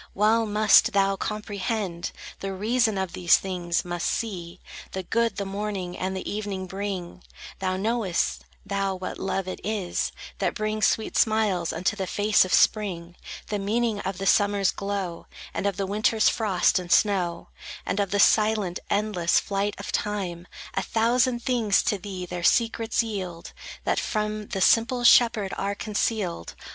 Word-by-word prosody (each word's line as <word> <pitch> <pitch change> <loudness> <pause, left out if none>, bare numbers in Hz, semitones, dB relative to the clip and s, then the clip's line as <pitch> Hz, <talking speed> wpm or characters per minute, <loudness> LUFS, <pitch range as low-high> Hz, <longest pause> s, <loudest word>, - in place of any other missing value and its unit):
Well 220 +3 +3
must 215 +2 +5
thou 195 0 +3
comprehend 205 -3 -3 0.3
The 195 0 -4
reason 220 +2 +1
of 190 -2 -2
these 175 -1 +4
things; 180 -3 -2
must 175 -1 -2
see 180 -6 -3 0.3
The 190 - -3
good 230 +5 0
the 200 - -3
morning 195 -2 -4
and 190 +1 -3
the - - -6
evening 205 -2 -3
bring: 190 -2 -5 0.4
Thou 185 -1 -1
knowest, 210 -3 -1 0.2
thou, 195 -1 -1
what 185 0 -6
love 190 -1 -2
it 185 - -5
is 205 -4 -2 0.3
That - - 0
brings 215 -1 +1
sweet 220 - -1
smiles 215 -6 +2
unto 180 +4 -1
the 190 -2 -3
face 205 +3 +3
of 185 - -5
spring; 180 -5 +2 0.3
The 210 - -1
meaning 220 +2 0
of 190 -1 -4
the 195 - -4
Summer's 200 -1 +3
glow, 195 -4 -4 0.3
And 200 - -1
of 195 -3 -2
the 195 - -1
Winter's 215 +2 +2
frost 200 -4 +2
and 175 -1 -7
snow, 185 -5 +2 0.4
And 205 - -1
of 200 -1 0
the 205 +2 0
silent, 210 -4 +3
endless 200 -4 +2
flight 200 +1 -2
of 200 - -6
Time. 185 -4 -3 0.3
A 195 - 0
thousand 235 +3 +1
things 230 -6 +2
to 205 - 0
thee 185 -1 -6
their 180 0 -5
secrets 230 +4 +2
yield, 185 -6 -6 0.3
That - - +1
from 210 -1 -2
the 190 - -3
simple 235 +5 +3
shepherd 230 -4 +5
are 200 +1 -1
concealed. 205 - -2
200 Hz, 160 wpm, -25 LUFS, 185-215 Hz, 0.4 s, must